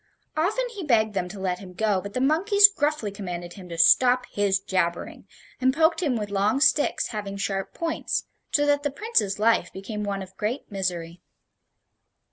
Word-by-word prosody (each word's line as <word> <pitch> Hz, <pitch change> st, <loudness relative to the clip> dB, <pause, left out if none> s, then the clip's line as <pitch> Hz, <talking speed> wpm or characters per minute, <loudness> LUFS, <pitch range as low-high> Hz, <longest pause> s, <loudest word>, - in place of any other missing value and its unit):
Often 420 Hz, +11 st, 0 dB
he 415 Hz, -5 st, -7 dB
begged 220 Hz, -7 st, +2 dB
them 180 Hz, -2 st, -2 dB
to 200 Hz, +1 st, -9 dB
let 180 Hz, -1 st, -2 dB
him 185 Hz, -2 st, -11 dB
go, 205 Hz, 0 st, 0 dB
but 200 Hz, +1 st, -8 dB
the -, -, 0 dB
monkeys 400 Hz, +9 st, +6 dB
gruffly 295 Hz, -, -1 dB
commanded 175 Hz, -3 st, -6 dB
him 185 Hz, -3 st, -12 dB
to 170 Hz, -, -6 dB
"stop 250 Hz, +8 st, +5 dB
his 200 Hz, -2 st, +1 dB
jabbering," 185 Hz, -3 st, -2 dB, 0.3 s
and 260 Hz, +1 st, +2 dB
poked 325 Hz, +2 st, +3 dB
him 285 Hz, -8 st, 0 dB
with 210 Hz, -3 st, -4 dB
long 205 Hz, +5 st, +1 dB
sticks 290 Hz, +1 st, +2 dB
having 205 Hz, -2 st, -5 dB
sharp 195 Hz, -1 st, -3 dB
points; 330 Hz, -1 st, -2 dB, 0.3 s
so 290 Hz, -, +2 dB
that 290 Hz, 0 st, +2 dB
the 290 Hz, -, -1 dB
Prince's 280 Hz, -, 0 dB
life 225 Hz, +2 st, +2 dB
became 210 Hz, +2 st, -6 dB
one 200 Hz, -1 st, -3 dB
of 190 Hz, 0 st, -14 dB
great 220 Hz, +5 st, -3 dB
misery. 175 Hz, -3 st, -4 dB
210 Hz, 180 wpm, -25 LUFS, 190-290 Hz, 0.3 s, monkeys